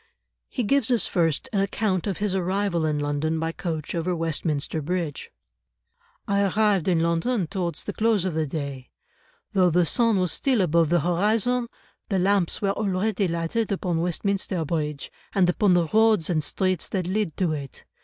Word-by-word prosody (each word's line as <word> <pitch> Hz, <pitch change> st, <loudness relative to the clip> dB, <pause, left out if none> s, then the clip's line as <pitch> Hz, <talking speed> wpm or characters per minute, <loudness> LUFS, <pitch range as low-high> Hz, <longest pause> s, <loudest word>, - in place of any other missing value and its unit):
He 245 Hz, -, -2 dB
gives 270 Hz, +2 st, +2 dB
us 240 Hz, -3 st, +2 dB
first 165 Hz, -5 st, 0 dB
an 200 Hz, -, +2 dB
account 195 Hz, -1 st, -1 dB
of 195 Hz, -, -2 dB
his 205 Hz, -2 st, -1 dB
arrival 185 Hz, -2 st, 0 dB
in 150 Hz, -1 st, 0 dB
London 145 Hz, +2 st, -1 dB
by 165 Hz, 0 st, -1 dB
coach 160 Hz, -3 st, -4 dB
over 175 Hz, +1 st, -1 dB
Westminster 160 Hz, -2 st, -1 dB
Bridge. 170 Hz, -1 st, -3 dB, 1.0 s
"I 200 Hz, 0 st, +2 dB
arrived 200 Hz, -2 st, +2 dB
in 170 Hz, -3 st, +3 dB
London 170 Hz, +6 st, +1 dB
towards 175 Hz, +1 st, -3 dB
the 205 Hz, -, -5 dB
close 220 Hz, -4 st, +1 dB
of 185 Hz, -, -1 dB
the 155 Hz, -1 st, -1 dB
day. 140 Hz, -3 st, -5 dB, 0.6 s
Though 185 Hz, -3 st, +4 dB
the 175 Hz, +1 st, +3 dB
sun 230 Hz, +4 st, +2 dB
was 180 Hz, -3 st, +1 dB
still 260 Hz, -, +1 dB
above 165 Hz, -2 st, +2 dB
the 175 Hz, -1 st, +3 dB
horizon, 215 Hz, -, +1 dB, 0.4 s
the 195 Hz, -, +1 dB
lamps 190 Hz, 0 st, +1 dB
were 195 Hz, -, +2 dB
already 200 Hz, 0 st, 0 dB
lighted 170 Hz, +7 st, -1 dB
upon 180 Hz, -4 st, -1 dB
Westminster 180 Hz, 0 st, -1 dB
Bridge, 150 Hz, -2 st, -3 dB, 0.2 s
and 190 Hz, -3 st, +4 dB
upon 180 Hz, +1 st, +3 dB
the 175 Hz, -1 st, +3 dB
roads 215 Hz, -2 st, +3 dB
and 155 Hz, -3 st, +1 dB
streets 185 Hz, -1 st, -1 dB
that 185 Hz, -3 st, -2 dB
lead 190 Hz, -3 st, -2 dB
to 180 Hz, -4 st, +1 dB
it. 140 Hz, -3 st, -6 dB
180 Hz, 175 wpm, -25 LUFS, 165-200 Hz, 1.0 s, Though